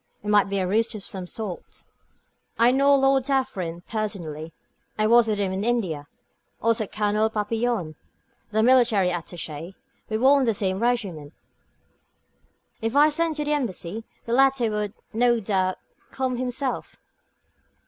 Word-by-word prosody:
It 210 - -4
might 205 -1 +4
be 200 - -1
a 190 - +1
ruse 225 +4 +1
of 205 - -7
some 185 -2 -6
sort. 200 -3 -7 0.7
"I 235 +1 +5
know 280 +2 +4
Lord 270 -1 +3
Dufferin 225 -12 -2
personally; 175 -8 -4 0.5
I 215 - +2
was 235 +1 +5
with 215 -1 0
him 200 -2 0
in 190 +2 -2
India. 190 -12 -1 0.5
Also 225 -2 +1
Colonel 210 +1 +1
Papillon, 220 -4 -1 0.6
the 220 +1 +1
military 235 -6 +4
attaché; 170 0 -6 0.3
we 220 - 0
were 270 +4 +5
in 265 - +1
the 225 -3 +1
same 190 -1 -1
regiment. 200 -11 -1 1.5
If 225 +3 -2
I 295 +2 +6
sent 325 +1 0
to 300 - -2
the 300 - +1
Embassy, 225 - -3 0.2
the 230 - -2
latter 265 -3 +3
would, 210 -1 -3 0.2
no 240 +1 +3
doubt, 190 -3 0 0.3
come 260 -2 -2
himself." 255 +1 -3
220 Hz, 150 wpm, -24 LUFS, 190-245 Hz, 1.5 s, I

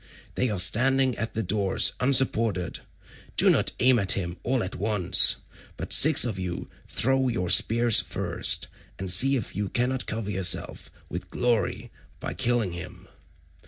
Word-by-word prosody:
They 125 - -2
are 105 - -4
standing 130 +7 +2
at 115 - -6
the 110 - -3
doors 100 0 +1
unsupported. 115 - -1 0.6
Do - - +5
not - - +1
aim 125 0 +3
at 95 -2 +4
him 85 -2 -5
all 130 +1 -2
at 95 - -7
once, 105 -2 +2 0.4
but - - -2
six 155 -3 +6
of 110 -6 -5
you 90 -2 -7 0.2
throw 135 +1 -1
your 90 -8 -2
spears 115 +3 +4
first, - - -1 0.3
and 95 -1 -2
see 135 +9 +6
if 115 -7 -6
you 100 0 -4
cannot 125 +3 -2
cover 110 -2 -5
yourselves 95 -3 -2 0.2
with - - -8
glory 120 -6 -3 0.3
by - - -7
killing 120 -6 -2
him. 85 0 -10
110 Hz, 155 wpm, -24 LUFS, 95-125 Hz, 0.6 s, six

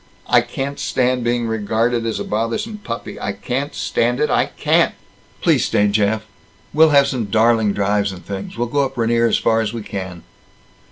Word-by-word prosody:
"I - - +5
can't 140 +1 -5
stand 130 -3 0
being 120 0 0
regarded 115 +2 0
as 110 - -2
a - - -2
bothersome 115 - -2
puppy. 115 - -6
I 100 - -2
can't 125 +8 -3
stand 120 +2 0
it! 150 - +1
I - - +3
can't!" - - +2 0.5
"Please - - +3
stay, 105 0 +2
Jeff! 110 +1 +1 0.5
We'll 160 +1 +6
have 140 -2 +5
some 130 -5 -2
darling 110 0 +3
drives 100 0 0
and 90 -2 -11
things. 100 +3 -6
We'll 120 - 0
go 140 +4 +1
up 135 - -4
Rainier 115 0 +2
as 115 - +2
far 115 0 +2
as 110 0 -3
we 115 -2 -5
can." 95 -4 -6
115 Hz, 185 wpm, -19 LUFS, 105-125 Hz, 0.5 s, We'll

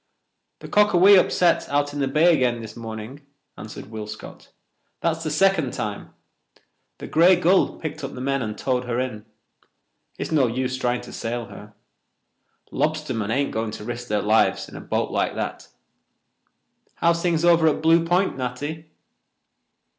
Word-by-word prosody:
"The - - -8
Cockawee 205 -1 +5
upset 175 -1 +2
out 145 0 0
in 145 - -4
the 135 - +1
bay 155 +6 +4
again 125 -5 +1
this 110 -2 -9
morning," 115 +4 -8 0.3
answered - - -10
Will 110 -1 -6
Scott. 110 +1 -10 0.5
"That's 165 -1 -1
the 155 - -2
second 160 -3 +2
time. 105 -1 -5 0.8
The - - -8
Grey 175 +4 +5
Gull 180 +2 +2
picked 155 -2 -6
up - - -5
the - - -7
men 135 +1 -1
and 110 -3 -4
towed 125 -1 -1
her 120 0 -2
in. 125 -5 -4 0.9
It's - - -5
no 145 -5 +3
use 130 +2 -2
trying 125 -1 -1
to - - -11
sail 120 +1 -4
her. 105 0 -12 1.0
Lobstermen 150 -9 -2
ain't 140 +4 0
going 110 0 -2
to 105 - -8
risk 120 +2 -6
their 105 -2 -1
lives 110 +2 +2
in - - -13
a - - -7
boat - - -2
like - - -1
that. - - -5 1.3
How's 170 0 +1
things 170 -2 +1
over 170 -2 +5
at 155 0 0
Blue 165 +1 +5
Point, 180 +3 +1
Natty?" 145 +5 -5
135 Hz, 160 wpm, -23 LUFS, 115-165 Hz, 1.3 s, Cockawee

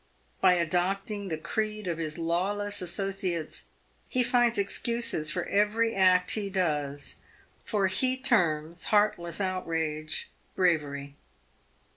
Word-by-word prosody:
By 185 -1 +6
adopting 190 +4 -1
the 160 -3 -2
creed 215 +5 -2
of 170 -2 -2
his 155 -1 -4
lawless 200 +5 -1
associates, 180 -3 -3 0.4
he 255 - +2
finds 240 -1 +3
excuses 200 -5 -1
for 175 +1 -2
every 215 +3 +2
act 185 -1 +4
he 205 -2 -1
does, 150 -7 -1 0.5
for 205 -3 0
he 255 +8 +3
terms 170 - +1
heartless 190 -5 +1
outrage 165 -5 -2
— - - -37
bravery. 145 -6 0
185 Hz, 115 wpm, -28 LUFS, 165-205 Hz, 0.5 s, By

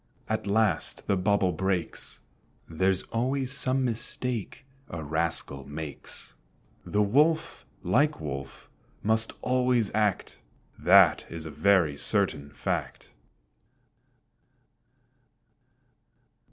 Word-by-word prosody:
At - - -2
last 100 -4 +1
the 100 - +2
bubble 95 0 +2
breaks; 90 0 -1 0.5
There's 95 +3 +1
always 130 +3 -1
some 130 -1 +2
mistake 120 +1 -4 0.2
a 85 -2 -5
rascal 80 -3 -2
makes. 75 0 -7 0.5
The 105 0 +1
Wolf 155 +9 +1 0.2
like 150 +1 +2
Wolf 70 -2 -6 0.4
must 110 +1 +2
always 125 -4 +1
act; 105 -3 0 0.4
That - - +5
is 80 -1 -7
a 80 - -6
very 80 -2 +3
certain 85 -9 -1
fact. 70 - -4
100 Hz, 90 wpm, -27 LUFS, 80-120 Hz, 0.5 s, That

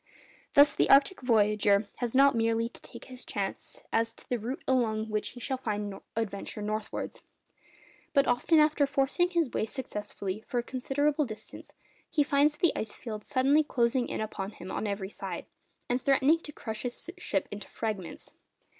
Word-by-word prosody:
Thus 285 +1 +8
the - - +2
arctic 280 +6 +5
voyager 210 -3 +3
has 245 0 -2
not 275 +1 +7
merely 230 0 +1
to 235 - -12
take - - -11
his 255 -1 -10
chance 195 -2 -5
as 230 0 +1
to - - -16
the 245 - -1
route 240 +5 -4
along 220 -4 +1
which 215 0 -1
he 245 - -10
shall 260 +1 -3 0.5
adventure 210 -1 -3
northwards, 215 0 -4 0.9
but 280 -2 +4
often, 250 +7 +3
after 300 -2 +4
forcing 285 +6 +1
his 335 -8 +1
way 220 - -1
successfully 210 -5 -5
for 245 - -2
a 240 - +1
considerable 285 +4 0
distance, 215 0 -9 0.4
he 305 -3 +3
finds 290 +1 +3
the 345 - +2
ice 220 - -3
fields 215 -3 -7
suddenly 280 +3 +4
closing 245 -2 +1
in - - -3
upon 210 -1 -4
him 185 -1 -8
on 215 - -2
every 200 -1 -3
side, - - -5 0.4
and 245 +1 0
threatening 275 +4 +4
to 305 - -9
crush 220 -6 -6
his 245 +7 -5
ship 195 - -1
into 205 -1 -7
fragments. 205 -6 -4
245 Hz, 170 wpm, -29 LUFS, 215-280 Hz, 0.9 s, Thus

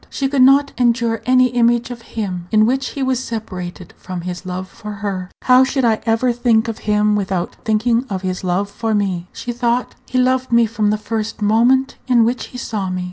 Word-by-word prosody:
She 275 - -1
could 270 -1 +1
not 275 +2 +5
endure 235 -2 +1
any 255 0 +5
image 240 0 +2
of 235 -1 -8
him 190 -6 -5
in 215 0 +5
which 260 +2 0
he 275 - -4
was 260 -1 0
separated 185 -6 -6
from 185 -2 -6
his 180 +1 -6
love 185 +1 -4
for 210 +2 -9
her. 200 -3 -4
"How 255 0 +6
should 265 -1 0
I 220 -2 +2
ever 230 +2 +2
think 235 -1 +2
of 225 -1 -4
him 210 0 +3
without 190 -3 -2
thinking 230 +3 +1
of 190 -1 -4
his 185 0 -3
love 185 +2 0
for 225 +1 -1
me?" 185 -4 -1
she 245 - -5
thought. 240 +1 -1
"He 255 - -2
loved 255 0 +1
me 235 0 +5
from 215 -1 0
the 210 - +1
first 215 0 -4
moment 245 +6 +3
in 240 -3 +4
which 245 +2 -1
he 250 - -10
saw 210 -6 -3
me. 185 0 -3
225 Hz, 210 wpm, -18 LUFS, 200-250 Hz, -, How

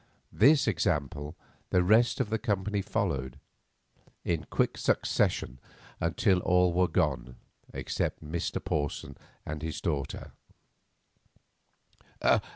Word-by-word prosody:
This 140 +6 +5
example 75 -5 -1 0.3
the 90 - +3
rest 110 +6 +4
of 105 - -1
the 110 - +1
company 105 0 -1
followed 65 -8 -2 0.9
in 80 -2 -1
quick - - +1
succession 65 - 0 0.4
until 90 +3 +2
all 90 0 +3
were 90 +1 +3
gone 65 -6 0 0.4
except - - -3
Mr. 80 +2 -2
Porson 75 -1 -2 0.3
and 75 0 -5
his 80 -2 -4
daughter. 75 -6 -3
85 Hz, 100 wpm, -29 LUFS, 75-100 Hz, 0.9 s, This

